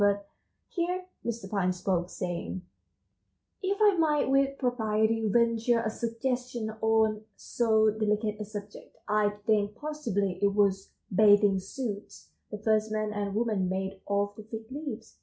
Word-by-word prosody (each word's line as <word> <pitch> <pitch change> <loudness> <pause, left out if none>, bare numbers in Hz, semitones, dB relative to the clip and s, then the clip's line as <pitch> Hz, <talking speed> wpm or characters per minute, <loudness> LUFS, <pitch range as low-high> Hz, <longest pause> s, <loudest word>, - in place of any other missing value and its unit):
But 200 0 +2 0.4
here 360 +1 -2 0.2
Mr. 230 -4 -4
Pine 190 -2 +1
spoke, 180 -1 -1
saying: 180 0 -4 1.0
"If 390 +1 0
I 415 -2 +6
might 300 -4 +2
with 275 0 +3
propriety 225 -3 +1
venture 230 +1 +3
a 220 -1 -1
suggestion 240 0 -2
on 220 -1 +3
so 220 -2 +2
delicate 210 0 0
a 210 - -4
subject, 205 0 -9
I 210 0 +3 0.2
think 210 -2 +2
possibly 210 -10 -2
it 200 0 +2
was 195 -2 +2 0.2
bathing 205 -1 +6
suits 205 +1 -6 0.2
the 210 - -5
first 215 0 +1
man 215 -1 -1
and 205 -1 -2
woman 215 -5 +1
made 190 +1 -3
of 200 0 0
the 215 - -9
fig 220 +2 -8
leaves. 290 +2 -7
215 Hz, 140 wpm, -29 LUFS, 200-235 Hz, 1.0 s, I